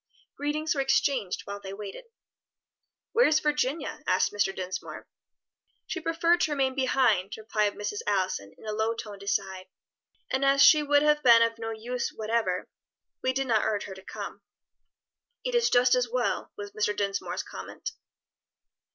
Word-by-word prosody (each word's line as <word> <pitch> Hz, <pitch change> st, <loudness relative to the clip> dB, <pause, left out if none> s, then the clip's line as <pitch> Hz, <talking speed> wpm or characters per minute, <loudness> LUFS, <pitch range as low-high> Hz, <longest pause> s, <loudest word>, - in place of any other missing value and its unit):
Greetings 300 Hz, +2 st, -1 dB
were 280 Hz, -, 0 dB
exchanged 270 Hz, -7 st, +1 dB
while 200 Hz, 0 st, -6 dB
they 195 Hz, -1 st, -8 dB
waited. 210 Hz, -, -8 dB, 1.1 s
"Where 475 Hz, +3 st, +5 dB
is 310 Hz, 0 st, +4 dB
Virginia?" 295 Hz, 0 st, -1 dB
asked -, -, +2 dB
Mr. 205 Hz, -2 st, +1 dB
Dinsmore. 185 Hz, -1 st, -6 dB, 0.8 s
"She -, -, -4 dB
preferred 335 Hz, +1 st, +2 dB
to 310 Hz, -, +1 dB
remain 265 Hz, -2 st, +1 dB
behind," 250 Hz, -7 st, +2 dB
replied 215 Hz, -1 st, 0 dB
Mrs. 205 Hz, 0 st, -4 dB
Allison 185 Hz, -, 0 dB
in -, -, -15 dB
a 215 Hz, -, -3 dB
low 220 Hz, +2 st, 0 dB
toned 205 Hz, -3 st, -8 dB
aside, 190 Hz, -2 st, -2 dB, 0.6 s
"and 265 Hz, +1 st, +1 dB
as 275 Hz, 0 st, +5 dB
she 305 Hz, -, +8 dB
would 290 Hz, 0 st, +3 dB
have 300 Hz, 0 st, +3 dB
been 235 Hz, -3 st, +7 dB
of 230 Hz, 0 st, -1 dB
no 225 Hz, 0 st, -4 dB
use 235 Hz, +3 st, -3 dB
whatever, 225 Hz, +1 st, -1 dB, 0.5 s
we 260 Hz, -, +1 dB
did 270 Hz, +1 st, -1 dB
not 225 Hz, -4 st, +2 dB
urge 210 Hz, -2 st, 0 dB
her 195 Hz, -, -7 dB
to 190 Hz, -, -12 dB
come." -, -, -7 dB, 1.0 s
"It -, -, -1 dB
is 475 Hz, -1 st, +3 dB
just 245 Hz, 0 st, +4 dB
as 250 Hz, -1 st, +2 dB
well," 245 Hz, 0 st, -1 dB
was 205 Hz, 0 st, -7 dB
Mr. 210 Hz, -1 st, -1 dB
Dinsmore's 200 Hz, -1 st, -2 dB
comment. 455 Hz, -, -7 dB
230 Hz, 160 wpm, -28 LUFS, 205-275 Hz, 1.1 s, she